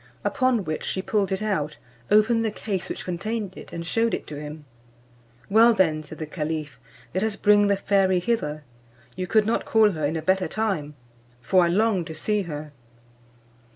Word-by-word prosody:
Upon 255 -5 +2
which 155 0 -3
she 190 - -2
pulled 200 -2 0
it 190 +2 -1
out, 155 -8 -1 0.3
opened 220 +2 +4
the 220 - +1
case 205 -3 -4
which - - -5
contained 195 +2 -3
it, - - -11
and 170 0 -5
shewed 225 +6 +1
it - - -7
to 150 -1 -7
him. 150 0 -8 0.8
"Well 230 +3 +6
then," 160 -6 +2
said 155 +1 -11
the 155 - -4
caliph, 155 -3 -4 0.3
"let 185 - 0
us 220 -2 0
bring 205 0 +4
the 200 -1 +2
fairy 195 -2 +2
hither; 175 -7 -1 0.5
you 185 - -3
could 215 +2 +3
not 225 - 0
call 220 -2 +4
her 155 -4 -5
in 155 - -3
a 160 - -3
better 190 +2 +2
time, 190 -10 -2 0.4
for 180 +9 +3
I - - +2
long 200 +1 +2
to 160 -1 -7
see 210 +6 0
her." 150 -4 -6
190 Hz, 190 wpm, -25 LUFS, 155-215 Hz, 0.8 s, Well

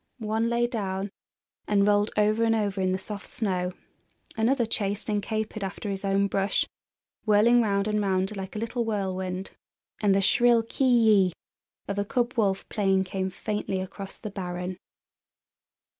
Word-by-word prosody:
One 220 0 0
lay 235 0 +2
down 195 -4 -3 0.6
and 200 -1 +3
rolled 205 0 +3
over 215 +2 +3
and 225 0 +3
over 200 -3 -1
in 185 0 +2
the 185 - +1
soft 200 +1 -7
snow; 185 -4 -1 0.6
another 235 +3 +2
chased 205 -1 -2
and 210 -1 +1
capered 215 0 -3
after 195 +2 -4
his 195 0 -4
own 195 0 +2
brush, 195 0 +1 0.6
whirling 225 +3 +5
round 200 -2 +1
and 210 0 +1
round 190 +1 0
like 190 +1 -6
a - - -2
little 230 +2 -1
whirlwind, 190 -3 -3 0.5
and 200 -2 +4
the 195 - +3
shrill 240 +2 +4
ki 245 +4 -1
yi 220 -7 +5 0.5
of 200 0 -2
a - - +2
cub 240 +4 0
wolf 195 -4 +1
playing 195 -3 +2
came 190 0 -2
faintly 205 0 -3
across 190 +1 -7
the 210 - -7
barren. 180 -1 -4
205 Hz, 160 wpm, -27 LUFS, 190-220 Hz, 0.6 s, whirling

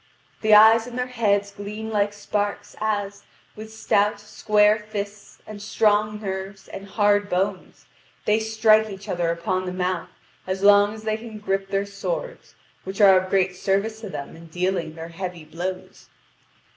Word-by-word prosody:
The 215 -1 +6
eyes 225 +2 +7
in 245 - -8
their 250 0 -1
heads 205 -5 0
gleam 210 +2 -7
like 205 -1 +1
sparks, 205 0 -3
as, 205 -2 -2 0.3
with 220 +1 -9
stout 210 -1 +1
square 210 0 +2
fists, 205 -1 -6
and 210 -1 -9
strong 210 0 +1
nerves, 195 -1 -6
and 195 +1 -9
hard 205 0 +2
bones, 190 +1 -2 0.4
they 210 +1 +3
strike 220 0 +3
each 195 0 -9
other 175 -2 -1
upon 185 +2 -2
the - - -2
mouth 180 -1 -2 0.4
as 190 +1 -3
long 205 +1 +6
as 215 - -11
they 215 0 -1
can 220 -1 -9
grip 195 -2 -2
their 195 0 0
swords, - - -5 0.3
which 190 +2 -7
are 195 -2 +8
of 185 - -8
great 190 -1 +1
service 200 +4 -1
to 215 - -7
them 140 -5 -7
in 165 +1 -13
dealing 175 -2 -2
their 165 0 -8
heavy 175 -1 -6
blows. 180 +4 -6
205 Hz, 165 wpm, -23 LUFS, 190-215 Hz, 0.4 s, are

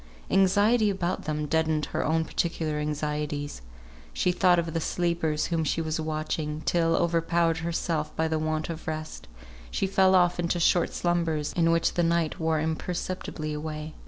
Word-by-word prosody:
Anxiety 205 +4 +4
about 185 -2 -2
them 150 0 -2
deadened 160 0 +1
her - - 0
own 160 +1 +1
peculiar 160 -4 -2
anxieties. 150 - -3 0.5
She 180 - +1
thought 180 0 +4
of 165 -1 -1
the 165 - -1
sleepers 170 -3 0
whom 165 -2 0
she 155 - 0
was 160 0 -2
watching, 155 -1 -3
till 165 0 +2
overpowered 170 0 +1
herself 165 -2 -2
by 160 - +1
the 160 0 0
want 155 0 -1
of 160 -1 -8
rest, 155 - -5 0.4
she - - -1
fell 190 0 +4
off 175 -1 +3
into 175 0 0
short 170 +1 +3
slumbers 165 -4 0
in 165 -1 +2
which 165 0 +2
the 175 - +1
night 170 -2 +1
wore 160 -1 +1
imperceptibly 160 0 -3
away. 155 0 -5
160 Hz, 160 wpm, -27 LUFS, 155-175 Hz, 0.5 s, Anxiety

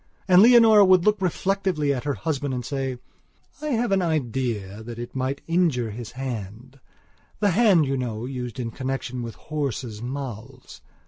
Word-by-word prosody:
And 185 0 +7
Leonora 225 -2 +7
would 185 -2 +5
look 210 -2 +2
reflectively 185 -5 0
at 130 0 -5
her 145 -2 -1
husband 140 +3 -2
and 125 -2 -4
say: 135 -1 -3 0.6
"I 305 - -4
have 240 -5 0
an 195 -1 +3
idea 120 - -2
that 115 +1 -8
it 120 +2 -7
might 130 +1 -2
injure 165 -10 +1
his 115 +1 -8
handthe 125 0 -7 0.6
hand, 200 -4 +4
you 135 0 -1
know, 120 -3 -4
used 125 -3 -6
in 115 -2 -3
connection 130 0 -4
with 115 -1 -6
horses' 130 -7 -4
mouths...." 125 -1 -7
135 Hz, 155 wpm, -24 LUFS, 120-175 Hz, 0.6 s, And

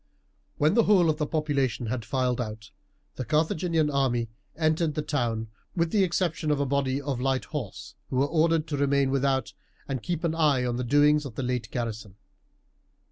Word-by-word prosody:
When 150 +3 +3
the 230 0 +4
whole 180 -6 +5
of 150 - -6
the 150 - 0
population 140 -7 0
had 120 +1 -3
filed 125 0 0
out, 110 -2 -7 0.5
the 130 - -2
Carthaginian 155 +3 +1
army 125 -5 +1 0.3
entered 155 0 +1
the 150 - -1
town, 115 -7 -1 0.3
with 170 -2 +1
the 205 -2 +3
exception 170 -3 0
of 150 -1 +2
a 140 - +1
body 135 0 0
of 140 -3 -3
light 135 0 0
horse 135 -10 -6 0.2
who - - -4
were 135 +2 +3
ordered 160 +1 +2
to 145 - -1
remain 140 -1 +2
without 135 -1 0 0.3
and 135 -3 -3
keep 175 +3 -3
an 165 -2 +1
eye 150 -6 +2
on 120 -1 -1
the 125 - -2
doings 145 +4 +4
of 130 -6 -8
the 135 - -3
late 125 -2 -2
garrison. 110 -5 -4
140 Hz, 190 wpm, -27 LUFS, 125-155 Hz, 0.5 s, whole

